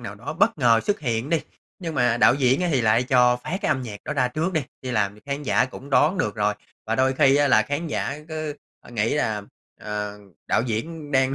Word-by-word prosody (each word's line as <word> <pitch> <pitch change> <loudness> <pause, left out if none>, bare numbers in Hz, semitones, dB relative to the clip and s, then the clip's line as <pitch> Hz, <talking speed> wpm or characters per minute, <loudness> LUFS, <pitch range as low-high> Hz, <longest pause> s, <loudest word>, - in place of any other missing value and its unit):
nào - - -7
đó - - -6
bất - - +2
ngờ 115 -2 +4
xuất 205 - 0
hiện 120 0 -2
đi, 165 -2 +2 0.4
nhưng 165 -4 -5
mà 120 -4 +2
đạo 120 - +5
diễn 130 +1 +2
á, 180 - +1
thì 135 - +2
lại 115 +1 +3
cho 125 -1 +4
phát 175 +9 -4
cái - - 0
âm 130 - +1
nhạc 105 -4 -7
đó 145 - -3
ra 130 -4 +1
trước 160 +8 -2
đi, 160 -3 0 0.2
thì 130 - -4
làm 100 -4 0
cho 105 - -18
khán 140 +1 -3
giả 105 -5 +2
cũng 130 +2 -10
đón 155 +7 +3
được - - 0
rồi. 105 -1 0 0.3
Và 110 - 0
đôi 130 +2 +2
khi 135 0 +4
á, 145 0 +3
là - - +5
khán 145 +4 -3
giả 145 -2 -3
cứ 155 -2 -4 0.4
nghĩ 115 0 0
là, 110 -8 -1 0.4
ờ, 105 -1 -4 0.3
đạo 110 - +2
diễn 145 +7 -4
đang 135 0 +3
130 Hz, 245 wpm, -24 LUFS, 115-150 Hz, 0.4 s, đạo